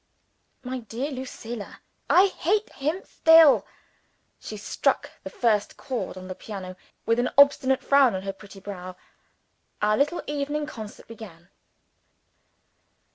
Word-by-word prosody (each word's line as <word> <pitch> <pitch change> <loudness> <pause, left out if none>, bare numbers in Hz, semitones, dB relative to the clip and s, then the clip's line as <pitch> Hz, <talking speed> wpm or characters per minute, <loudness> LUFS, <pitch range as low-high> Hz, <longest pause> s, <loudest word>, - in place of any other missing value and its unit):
"My 255 0 -4
dear 245 +5 -5
Lucilla!" 240 -4 -7 0.3
"I 370 - +7
hate 400 +2 -1
him 305 +7 -2
still!" 325 -3 +6 0.7
She 215 - -8
struck 205 - -1
the - - -6
first 215 -4 0
chords 255 -8 -4
on 185 0 -9
the 185 - -5
piano, 185 -2 -8 0.3
with 230 +1 +2
an 250 - +1
obstinate 280 -2 +5
frown 275 -6 +4
on 190 - -4
her 195 0 -4
pretty 195 0 -14
brow. 185 -2 -8 0.8
Our 210 0 +2
little 295 +5 0
evening 295 +1 -2
concert 220 -8 -10
began. 185 -7 -12
240 Hz, 130 wpm, -25 LUFS, 205-285 Hz, 0.8 s, I